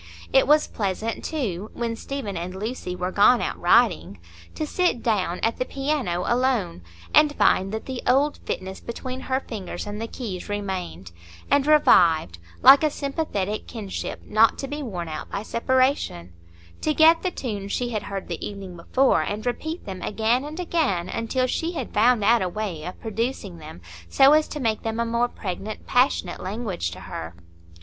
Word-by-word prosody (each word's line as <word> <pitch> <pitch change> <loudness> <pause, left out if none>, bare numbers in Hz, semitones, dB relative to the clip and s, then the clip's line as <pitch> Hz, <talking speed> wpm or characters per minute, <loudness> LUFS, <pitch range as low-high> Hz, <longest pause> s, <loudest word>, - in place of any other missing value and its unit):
It 265 -1 +5
was 300 +1 +5
pleasant, 215 +2 -3
too, 215 - -3
when 230 -1 -2
Stephen 235 -5 -5
and 175 +2 -5
Lucy 205 -2 -4
were 180 +1 -3
gone 210 +5 +5
out - - -3
riding, 175 - +3 0.4
to 310 - -2
sit 355 -6 0
down 195 -6 0
at 225 - +1
the - - +2
piano 270 - -2
alone, 240 - 0 0.3
and 300 -1 +5
find 190 +1 +3
that 220 0 -4
the 260 -2 -5
old 280 +4 +3
fitness 190 +1 -5
between 255 +2 -6
her 260 0 -1
fingers 215 -8 -6
and 210 +1 -5
the 230 - -3
keys 210 -7 -6
remained, 190 - -4 0.4
and 285 0 +3
revived, 165 - +4 0.2
like 280 +3 +9
a 310 - +4
sympathetic 275 -9 -3
kinship 210 -5 -5
not 220 +2 +4
to 275 - -4
be 295 +2 -5
worn 185 -10 -5
out 155 -1 -6
by 200 - -4
separation; 255 - 0 0.5
to 305 - 0
get 325 +1 +6
the 370 - 0
tunes 205 - -5
she 245 -1 -1
had 215 -3 -2
heard 195 -1 -6
the 170 -2 -5
evening 195 -3 -7
before, 255 +10 +2
and 210 +2 -4
repeat 315 +7 -3
them 190 -2 -6
again 225 +4 +1
and 305 +4 -7
again 280 - 0
until 255 +3 -1
she 330 +7 -2
had 265 -8 -5
found 225 0 +4
out 230 +3 +4
a 185 - 0
way 190 -6 -4
of 180 - -7
producing 220 -5 -3
them 155 - -11 0.3
so 270 +2 +6
as 310 0 +4
to 300 - -6
make 225 -5 0
them 225 0 -3
a 235 - +1
more 235 +1 +1
pregnant, 205 -1 -6
passionate 245 -8 +1
language 195 - -3
to - - -10
her. 80 +1 -7
225 Hz, 180 wpm, -24 LUFS, 190-265 Hz, 0.5 s, like